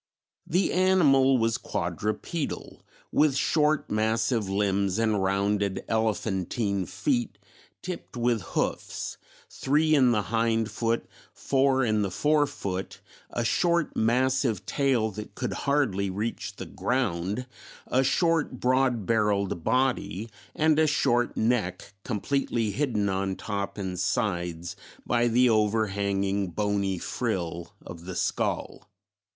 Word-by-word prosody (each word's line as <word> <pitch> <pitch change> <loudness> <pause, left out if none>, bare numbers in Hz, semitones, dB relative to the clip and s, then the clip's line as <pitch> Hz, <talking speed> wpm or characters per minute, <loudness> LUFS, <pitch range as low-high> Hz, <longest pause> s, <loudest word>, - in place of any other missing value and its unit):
The 180 +3 +1
animal 145 -8 +4
was 115 -1 +1
quadrupedal, 110 +9 -3 0.3
with 150 -3 +3
short 150 +1 +1
massive 110 0 +1
limbs 100 -1 +1
and 110 -3 +1
rounded 100 +1 0
elephantine 105 -2 -1
feet 250 -5 -1 0.5
tipped 180 -8 -6
with 120 -2 +1 0.2
hoofs, - - -2 0.3
three 155 +3 +2
in 130 -5 +5
the 105 -3 +1
hind 115 0 0
foot, 115 0 -1 0.3
four 135 -1 +2
in 110 -2 +1
the 100 - 0
fore 150 - +2
foot, 95 -9 -5 0.3
a 120 - -2
short 170 +5 +1
massive 125 -1 +1
tail 120 0 +1
that 105 +1 -8
could - - -3
hardly 125 -10 0
reach 105 +5 -4
the - - -7
ground, 105 -2 -1 0.4
a 130 +1 +2
short 160 -2 +1
broad 130 -4 +2
barrelled 100 -6 +1
body 125 -4 0 0.2
and 155 0 +3
a 160 - +4
short 120 -4 +1
neck 100 -5 -1
completely 115 -1 -1
hidden 115 -6 0
on 95 0 -1
top 100 -1 -4
and 95 -3 -4
sides 90 -3 -1 0.3
by 120 0 +2
the 125 +2 +4
overhanging 100 -3 +1
bony 100 0 -1
frill 85 -6 -3
of 85 0 -9
the 95 -1 -6
skull. - - -2
110 Hz, 120 wpm, -27 LUFS, 100-130 Hz, 0.5 s, in